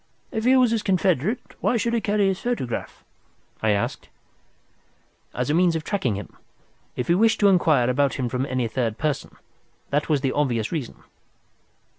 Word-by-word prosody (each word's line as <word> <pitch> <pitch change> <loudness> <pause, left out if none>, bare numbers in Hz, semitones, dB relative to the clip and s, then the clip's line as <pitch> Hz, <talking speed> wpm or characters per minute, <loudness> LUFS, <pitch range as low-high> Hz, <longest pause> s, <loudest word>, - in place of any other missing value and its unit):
"If 220 -3 -3
he 260 +1 +5
was 250 -3 +4
his 225 -2 +1
confederate, 190 - 0
why 240 - +1
should 235 +1 -1
he 230 - +1
carry 205 -2 +1
his 190 -1 0
photograph?" 235 - -3 0.6
I 110 - +1
asked. 100 -1 -1 1.2
"As 125 +3 -2
a - - +1
means 175 0 +3
of 160 - -2
tracing 160 - -1
him, 100 -4 -8 0.6
if 125 - -3
he 170 - +4
wished 220 +5 +3
to 200 - +6
inquire 155 -9 +3
about 140 +2 +1
him 130 -3 -2
from 125 +3 -2
any 130 -3 -1
third 115 -1 -2
person. 150 -2 -2 0.6
That 145 +3 0
was 150 -3 +2
the 135 - 0
obvious 120 -7 0
reason. 145 -8 -5
155 Hz, 175 wpm, -24 LUFS, 125-205 Hz, 1.2 s, to